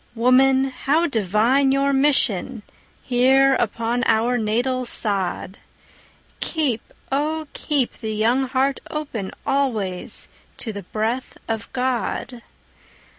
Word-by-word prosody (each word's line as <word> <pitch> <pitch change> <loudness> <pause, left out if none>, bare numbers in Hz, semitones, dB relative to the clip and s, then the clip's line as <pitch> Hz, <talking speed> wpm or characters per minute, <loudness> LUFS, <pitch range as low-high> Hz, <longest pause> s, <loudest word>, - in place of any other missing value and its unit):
Woman, 260 +3 +4
how 295 +6 +1
divine 235 - +2
your 275 +1 +2
mission 260 -5 +2 0.4
Here 265 +2 +4
upon 235 0 -1
our 230 +2 +2
natal 245 +3 0
sod! 200 -5 -1 0.8
Keep, 285 -9 0 0.3
oh, 310 +3 -1
keep 285 -5 -1
the 220 -2 -5
young 240 +5 +2
heart 265 +2 0
open 265 -11 -4 0.2
Always 220 -10 -1 0.3
to 225 - -5
the 200 - -6
breath 220 +7 -3
of 225 0 -4
God! 250 -1 -2
250 Hz, 105 wpm, -22 LUFS, 220-270 Hz, 0.8 s, Woman